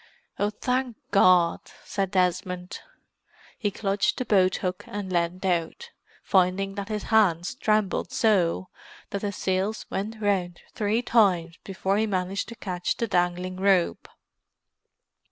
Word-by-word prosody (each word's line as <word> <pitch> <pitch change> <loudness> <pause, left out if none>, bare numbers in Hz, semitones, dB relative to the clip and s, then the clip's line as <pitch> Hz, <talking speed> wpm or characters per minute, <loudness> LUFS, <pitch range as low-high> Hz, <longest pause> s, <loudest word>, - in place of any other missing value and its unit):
"Oh, 205 - +2
thank 250 +2 -2
God!" 180 -3 +5 0.2
said 195 -2 -2
Desmond. 180 0 -1 0.8
He 210 - 0
clutched 200 0 0
the 255 - -2
boathook 185 -3 +1
and 200 -3 -5
leaned 175 +2 -1
out, 185 - -1 0.3
finding 190 +1 +2
that 200 +1 -5
his 210 -1 -3
hands 180 -5 +3
trembled 215 -2 0
so 195 -8 +2 0.4
that 200 - -3
the 205 - -2
sails 190 +3 -1
went 215 +3 -3
round 190 -4 -1
three 220 +1 0
times 180 -8 +2
before 195 0 -1
he 220 +1 +1
managed 190 0 -2
to 235 - -8
catch 180 -4 -3
the 230 - 0
dangling 180 -1 0
rope. 190 -2 +1
195 Hz, 130 wpm, -26 LUFS, 180-210 Hz, 0.8 s, God